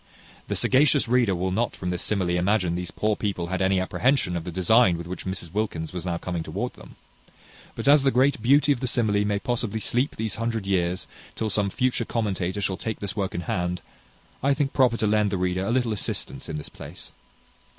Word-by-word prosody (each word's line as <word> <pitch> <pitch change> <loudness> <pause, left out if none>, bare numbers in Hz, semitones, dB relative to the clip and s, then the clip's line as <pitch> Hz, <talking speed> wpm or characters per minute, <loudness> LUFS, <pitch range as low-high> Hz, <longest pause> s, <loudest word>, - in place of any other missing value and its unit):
The - - -2
sagacious 140 +1 +3
reader 120 -5 +3
will 95 +2 -1
not 115 +5 0
from 90 -1 -3
this 90 - -2
simile 95 -4 0
imagine 90 0 +1
these 90 0 -3
poor 105 0 0
people 95 -5 -3
had 95 - -1
any 95 0 +3
apprehension 105 0 +1
of 85 -1 -3
the 90 - -4
design 95 +2 +4
with 85 - -6
which 90 +2 -6
Mrs 90 -3 -4
Wilkins 100 -7 -2
was 90 0 -5
now 85 -1 -1
coming 85 -1 -3
towards - - -4
them; - - -14 0.8
but - - -4
as 145 0 +7
the 135 - +3
great 130 -1 +2
beauty 140 +5 +4
of 135 - +1
the 130 - -2
simile 110 -5 +2
may 105 0 0
possibly 115 -2 -1
sleep 125 +6 0
these 110 -2 -3
hundred 115 -2 -2
years, 90 -2 0 0.3
till 110 -1 -2
some 100 0 +1
future 125 +2 0
commentator 100 -4 -2
shall 95 -1 -1
take 110 +1 -4
this 100 0 -4
work 100 -3 -2
in 85 - -2
hand, 90 0 -2 0.6
I 140 +1 +2
think 140 -1 -1
proper 125 -3 +3
to 110 - 0
lend 105 0 +2
the 100 - -1
reader 90 +1 0
a - - 0
little 120 -3 +1
assistance 105 - -3
in 80 - -3
this 75 - -6
place. - - -10
105 Hz, 215 wpm, -25 LUFS, 90-120 Hz, 0.8 s, as